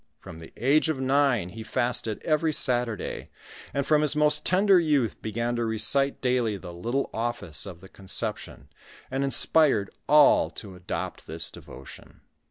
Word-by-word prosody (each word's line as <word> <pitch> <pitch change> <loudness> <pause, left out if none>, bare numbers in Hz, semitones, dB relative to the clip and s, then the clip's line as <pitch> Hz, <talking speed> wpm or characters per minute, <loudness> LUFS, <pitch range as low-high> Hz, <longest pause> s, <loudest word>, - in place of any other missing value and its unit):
From 80 - -12
the 80 - -12
age 145 +6 +2
of 150 -4 -2
nine, 130 -7 +1
he 110 +4 -9
fasted 115 -1 -1
every 155 0 0
Saturday; 120 -6 -1 0.4
and 140 -1 -2
from 150 +1 +3
his 150 0 +1
most 150 0 +3
tender 190 0 +4
youth 145 -9 0
began 115 +2 -3
to 120 - -1
recite 115 +5 0
daily 125 -5 0
the 90 -2 -10
little 120 +10 -3
office 110 -9 -3
of 90 -3 -10
the 95 - -13
Conception, 95 -1 -3 0.4
and 135 +1 -1
inspired 135 -6 +3 0.2
all 150 -1 +5
to 100 -3 -9
adopt 90 0 -6
this 80 +1 +1
devotion. 65 - -13
120 Hz, 155 wpm, -26 LUFS, 105-145 Hz, 0.4 s, all